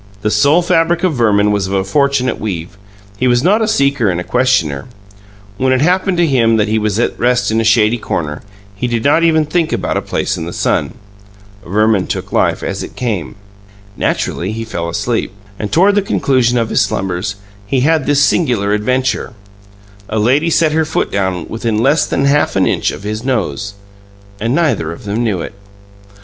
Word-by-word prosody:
The 105 - +1
soul 145 +12 +3
fabric 170 +1 +1
of 185 -3 +2
Verman 105 -5 +2
was 100 -2 0
of 95 - -4
a 95 -1 +1
fortunate 140 +3 0
weave; 90 -3 -5 0.4
he 130 - +2
was 120 0 +2
not 205 +6 +3
a 220 - +1
seeker 140 - +1
and 90 -1 -3
questioner. 120 - +1 0.7
When 130 0 +1
it 130 0 +2
happened 180 +3 +1
to 175 - +3
him 115 -6 +2
that 105 0 +1
he 110 +1 +1
was 105 -1 -1
at 120 - -1
rest 125 -1 +1
in 110 +1 +1
a - - 0
shady 110 +1 +3
corner, 75 -7 -3 0.3
he 125 +5 -2
did 120 -2 -2
not 150 +4 +3
even 160 -2 +3
think 165 +1 0
about - - -1
a - - -1
place - - -2
in 80 - -5
the 85 - -6
sun. - - -1 0.7
Verman 105 +1 +1
took - - -4
life - - +1
as - - -3
it - - -8
came. 95 - -3 0.6
Naturally, 95 -1 -2
he 115 +1 -5
fell 85 -6 -4
asleep. 115 +7 -2 0.3
And 105 - -4
toward 195 +5 +4
the 205 - +2
conclusion 130 - +1
of 115 -2 0
his - - +2
slumbers, 95 -2 -2 0.3
he 130 +4 +1
had 155 0 +2
this 145 -1 +3
singular 115 - +1
adventure: 130 +4 -1 0.8
a 110 - -2
lady 130 +10 +2
set 160 -1 +2
her 160 +1 +2
foot 155 - -2
down 95 -4 -2
within 115 -1 -2
less 145 +6 +2
than 135 - 0
half 145 +1 +2
an 95 - +3
inch - - 0
of - - -7
his 110 +2 -4
nose 105 - -2 0.6
and 115 +5 0
neither 150 - 0
of 85 - -10
them 105 +4 -1
knew 100 -7 -1
it. - - -6
120 Hz, 195 wpm, -15 LUFS, 105-140 Hz, 0.8 s, toward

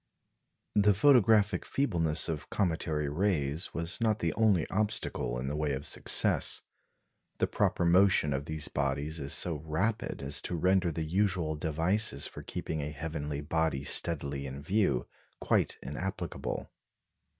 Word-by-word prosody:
The 105 -1 +4
photographic 110 -4 +4
feebleness 85 - +1
of 75 -3 -4
cometary 80 -5 -1
rays 80 -2 -1
was 85 +6 -3
not 110 -2 +2
the 85 -6 -1
only 105 -6 +2
obstacle 105 - -1
in 60 - -4
the 70 - -2
way 75 -2 -1
of 65 +2 -4
success. - - +3 0.7
The - - +2
proper 85 - 0
motion 90 -4 +4
of 70 +1 -3
these 80 -1 -4
bodies 70 +3 -2
is 70 -1 -4
so 85 -3 +1
rapid 80 +6 -2
as 70 0 -1
to 90 - -3
render 90 +1 +2
the 80 +1 -3
usual 90 -2 0
devices 80 +3 0
for - - -6
keeping 80 -2 -4
a 70 - -3
heavenly 75 -1 -5
body 80 -2 -1
steadily 70 -4 0
in 70 +2 -8
view 95 - +1 0.3
quite - - +1
inapplicable. 85 +4 -5
80 Hz, 140 wpm, -30 LUFS, 75-95 Hz, 0.7 s, The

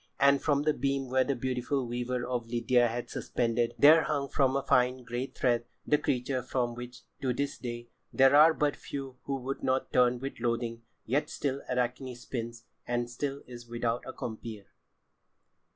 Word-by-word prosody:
And 140 0 +5
from 145 -1 +2
the 155 0 +3
beam 135 -1 -1
where 130 0 +4
the 140 +1 -1
beautiful 130 +2 -1
weaver 120 +1 -2
of 120 -2 -3
Lydia 120 +1 +3
had 120 +1 -3
been - - -25
suspended, 120 -1 -1
there 155 +3 +8
hung 140 -2 -1
from 135 -2 +2
a 140 - 0
fine 125 -1 +2
grey 120 +2 -3
thread 120 -3 0 0.2
the 150 - +3
creature 130 -2 -1
from 125 -1 -1
which, 120 +1 -9 0.2
to 130 -2 +1
this 140 +3 -3
day, 120 -1 -6 0.2
there 135 +1 +5
are 155 +2 +7
but 145 -1 +1
few 135 -2 -7
who 135 -1 -2
do - - -20
not 130 0 0
turn 125 0 +4
with 135 +1 -6
loathing. 115 -1 -1 0.2
Yet 135 +6 0
still 140 -1 -2
Arachne 125 +1 -1
spins, 115 -1 -6 0.2
and 120 0 -1
still 140 +3 -4
is 120 -1 -10
without 120 0 -1
a - - -4
compeer. 110 -4 -7
125 Hz, 180 wpm, -30 LUFS, 120-135 Hz, 0.2 s, there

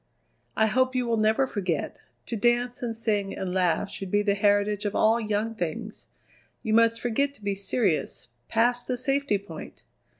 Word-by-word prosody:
"I 220 - +5
hope 255 +4 +1
you 250 -1 +1
will 235 -1 +1
never 220 +5 +3
forget. 185 - -3 0.3
To 235 - -3
dance 240 +2 +1
and 235 -2 -3
sing 210 -3 -1
and 185 -1 -3
laugh 185 +2 +1
should 195 -2 -6
be 205 +2 +2
the 205 -1 +2
heritage 205 +1 +2
of 205 -1 -2
all 225 +2 +4
young 215 +1 -1
things. 175 -8 -5 0.6
You 220 - -1
must 230 0 +4
forget 280 +4 0
to 215 - -21
be 200 0 0
serious, 195 - -1 0.2
past 240 +2 +1
the 250 - -1
safety 275 -3 +1
point! 185 -5 -10
215 Hz, 175 wpm, -26 LUFS, 200-240 Hz, 0.6 s, I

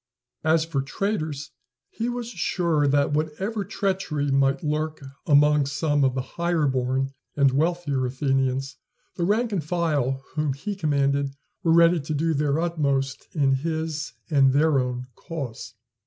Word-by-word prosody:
As 160 +1 +3
for 155 -5 -1
traitors, 150 -2 -3 0.4
he 230 +2 -2
was 240 -1 -4
sure 170 -10 0
that, 145 +1 +2
whatever 190 +8 -1
treachery 185 -8 -1
might 135 0 +2
lurk 155 +1 -1 0.3
among 150 -1 +5
some 145 0 +1
of 130 -1 +2
the 130 - -1 0.2
higher 170 -3 +2
born 130 0 0 0.2
and 140 -2 +4
wealthier 150 -2 0
Athenians, 135 0 -1 0.4
the 170 - -1
rank 220 +5 +1
and 185 -6 -1
file 145 -5 0
whom 150 -2 0
he 200 +10 -5
commanded 140 -4 0 0.3
were 170 -4 +2
ready 170 +1 +6
to 150 +1 -3
do 160 +2 +1
their 145 0 +1
utmost 140 -5 -1
in 140 -3 +3
his 160 +2 -2
and 135 -4 +4
their 150 0 +4
own 125 0 -2
cause. 140 -11 -7
150 Hz, 145 wpm, -25 LUFS, 135-165 Hz, 0.4 s, ready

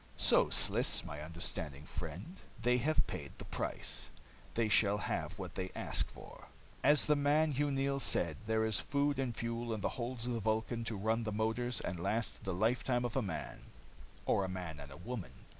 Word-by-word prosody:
"So, - - +5
Sliss, - - +2
my 75 - -6
understanding 75 -2 -2
friend, 85 - -6 0.2
they 125 0 +3
have 155 +6 +2
paid - - -6
the - - -8
price, - - -3 0.5
they 115 -1 +2
shall 105 -1 +4
have 105 - -2
what - - -6
they 95 0 -3
ask - - 0
for. - - -12 0.4
"As 150 0 +6
the 150 - +4
man, 150 +2 +3
Hugh 145 +1 +1
Neils, 140 0 +1
said, 85 -8 +3
there 110 0 +2
is 110 -3 +2
fuel 140 -1 +1
and 120 -4 -2
food 115 0 -2
in 105 - -5
the - - +1
holds 120 -1 -3
of 125 - -1
the 115 - -1
Vulcan 110 +2 0
to 110 -2 -1
run 110 +3 +1
the 110 - -2
motors 115 +2 0
and 90 -1 -3
last 110 +6 -1
the 95 - -1
lifetime 120 +4 +2
of 120 - -3
a - - +3
man 95 -6 -4 0.7
or 100 - +3
a 95 - -2
man 90 -5 -5
and 70 -1 -9
a 70 - -9
woman. 110 +1 -5
115 Hz, 195 wpm, -35 LUFS, 95-125 Hz, 0.7 s, As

